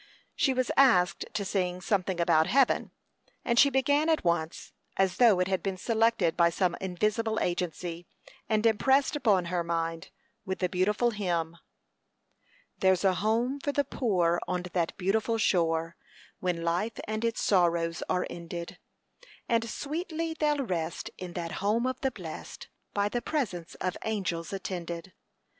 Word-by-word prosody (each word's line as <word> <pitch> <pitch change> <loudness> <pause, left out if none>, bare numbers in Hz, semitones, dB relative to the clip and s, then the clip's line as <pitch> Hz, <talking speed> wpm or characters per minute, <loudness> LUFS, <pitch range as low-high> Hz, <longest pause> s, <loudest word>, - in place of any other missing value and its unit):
She 300 -4 +2
was 255 -1 0
asked 195 -10 +4
to 205 -2 -2
sing 180 -2 -1
"something 190 -1 -1
about 165 -2 +3
heaven;" 270 -1 +3 0.6
and 235 0 +2
she 280 - +7
began 285 +4 +2
at 320 - +2
once, 170 -2 -1 0.2
as 190 -1 +2
though 225 -7 +6
it 180 - +2
had 190 -1 0
been 195 -2 -3
selected 225 -5 +2
by 170 -1 +4
some 175 0 0
invisible 215 +4 0
agency 175 -1 -3 0.4
and 215 0 +1
impressed 265 +6 +3
upon 205 -11 +2
her 175 -1 +1
mind, 165 0 -2 0.3
with 190 0 -3
the 180 - 0
beautiful 210 +6 +1
hymn: 170 -6 -2 1.2
"There's 190 -1 +3
a 190 -1 +4
home 225 +8 0
for 285 - -1
the 285 0 +1
poor 180 -11 +1
on 180 -1 -1
that 170 -3 -1
beautiful 215 +4 +1
shore 165 -5 +1 0.4
When 175 -2 -1
life 180 +7 -1
and 215 +1 -3
its 230 -1 0
sorrows 170 -3 +2
are 180 - +1
ended; 170 0 -7 0.7
And 230 -1 +1
sweetly 325 +4 -3
they'll 295 -3 0
rest 170 -5 -3
in 180 -1 -6
that 170 -2 -4
home 215 +4 +1
of 255 0 -2
the 265 - +2
blest, 180 -10 -9 0.3
By 205 0 +2
the 240 +3 -2
presence 190 - -3
of 185 -1 -3
angels 185 -6 -2
attended. 180 -2 -5
190 Hz, 150 wpm, -29 LUFS, 175-230 Hz, 1.2 s, she